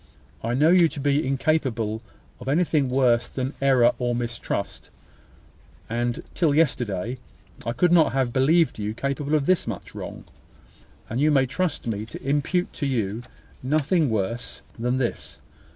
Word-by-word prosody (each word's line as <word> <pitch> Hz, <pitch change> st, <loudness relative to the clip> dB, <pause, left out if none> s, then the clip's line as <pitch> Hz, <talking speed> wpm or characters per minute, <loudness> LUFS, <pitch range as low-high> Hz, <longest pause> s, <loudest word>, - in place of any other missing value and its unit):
I 115 Hz, +2 st, 0 dB
know 150 Hz, +5 st, +4 dB
you 175 Hz, -2 st, +6 dB
to 155 Hz, -, -7 dB
be 140 Hz, 0 st, +1 dB
incapable 130 Hz, -6 st, 0 dB, 0.4 s
of 125 Hz, -, -10 dB
anything 150 Hz, -3 st, +2 dB
worse 125 Hz, -2 st, +3 dB
than 130 Hz, +2 st, -3 dB
error 130 Hz, -3 st, +5 dB
and 120 Hz, -1 st, 0 dB
mistrust 120 Hz, -4 st, -4 dB, 1.0 s
(and, 120 Hz, +1 st, -2 dB
till 150 Hz, -4 st, +2 dB
yesterday, 120 Hz, -, 0 dB, 0.5 s
I 115 Hz, -, 0 dB
could 175 Hz, +7 st, +2 dB
not 170 Hz, -3 st, +5 dB
have 130 Hz, -2 st, 0 dB
believed 155 Hz, +2 st, +3 dB
you 105 Hz, +1 st, -3 dB
capable 140 Hz, +3 st, -1 dB
of 145 Hz, -2 st, +1 dB
this 185 Hz, -5 st, +2 dB
much 110 Hz, -6 st, -6 dB
wrong): -, -, -7 dB, 0.8 s
and 120 Hz, +4 st, -2 dB
you 150 Hz, -, +4 dB
may 135 Hz, -3 st, +4 dB
trust 170 Hz, +5 st, -2 dB
me 110 Hz, -2 st, -3 dB
to 130 Hz, -, -9 dB
impute 150 Hz, +6 st, 0 dB
to 145 Hz, -, -2 dB
you 110 Hz, -4 st, -1 dB, 0.4 s
nothing 155 Hz, +3 st, +1 dB
worse 110 Hz, +2 st, -3 dB, 0.2 s
than 125 Hz, +2 st, 0 dB
this. 125 Hz, -3 st, -3 dB
130 Hz, 150 wpm, -24 LUFS, 120-150 Hz, 1.0 s, you